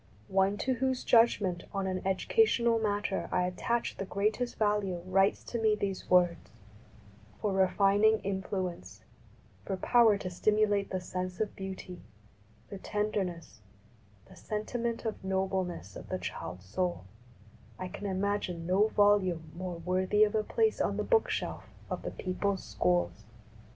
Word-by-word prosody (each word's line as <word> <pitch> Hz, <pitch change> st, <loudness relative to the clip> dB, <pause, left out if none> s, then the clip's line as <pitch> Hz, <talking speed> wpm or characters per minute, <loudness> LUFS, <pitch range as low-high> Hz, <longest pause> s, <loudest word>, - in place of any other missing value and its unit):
One 195 Hz, +1 st, +2 dB
to 260 Hz, -, 0 dB
whose 260 Hz, 0 st, -1 dB
judgment 205 Hz, -7 st, +3 dB
on 195 Hz, -1 st, -2 dB
an 185 Hz, -1 st, -2 dB
educational 235 Hz, -, +3 dB
matter 205 Hz, -2 st, -1 dB
I 180 Hz, -1 st, +2 dB
at 180 Hz, 0 st, -3 dB
tach 235 Hz, +5 st, -1 dB
the -, -, -1 dB
greatest 215 Hz, +6 st, -1 dB
value 205 Hz, -5 st, 0 dB
writes 195 Hz, +2 st, +2 dB
to 235 Hz, -, -4 dB
me 215 Hz, -1 st, +4 dB
these 195 Hz, -2 st, -4 dB
words: 180 Hz, -1 st, +3 dB, 0.4 s
" 105 Hz, 0 st, -24 dB
For 205 Hz, -2 st, -1 dB
refining 200 Hz, +3 st, +4 dB
influence, 185 Hz, -, -4 dB, 0.6 s
for 190 Hz, -, -3 dB
power 225 Hz, 0 st, +4 dB
to 185 Hz, -, -5 dB
stimulate 205 Hz, +1 st, +2 dB
the 185 Hz, -, -2 dB
sense 180 Hz, 0 st, -5 dB
of 215 Hz, -, -2 dB
beauty, 190 Hz, -2 st, -7 dB, 0.7 s
the 200 Hz, -, -6 dB
tenderness, 190 Hz, -, -3 dB, 0.6 s
the -, -, -16 dB
sentiment 230 Hz, +2 st, -3 dB
of 220 Hz, -3 st, -4 dB
nobleness 190 Hz, -, -2 dB
of -, -, -9 dB
the -, -, -1 dB
child 90 Hz, +1 st, -6 dB
soul, 175 Hz, -, -2 dB, 0.7 s
I 185 Hz, -, -4 dB
can 200 Hz, +3 st, -6 dB
imagine 190 Hz, -3 st, -1 dB
no 190 Hz, +5 st, +3 dB
volume 190 Hz, -7 st, +2 dB
more 180 Hz, -1 st, -5 dB
worthy 185 Hz, +4 st, +2 dB
of 210 Hz, -, +2 dB
a 215 Hz, -, +2 dB
place 445 Hz, -, +1 dB
on -, -, 0 dB
the -, -, 0 dB
book 460 Hz, -2 st, +2 dB
shelf -, -, -3 dB, 0.3 s
of -, -, -2 dB
the -, -, -4 dB
people's 190 Hz, +1 st, -2 dB
schools." 90 Hz, 0 st, 0 dB
195 Hz, 150 wpm, -30 LUFS, 180-210 Hz, 0.7 s, me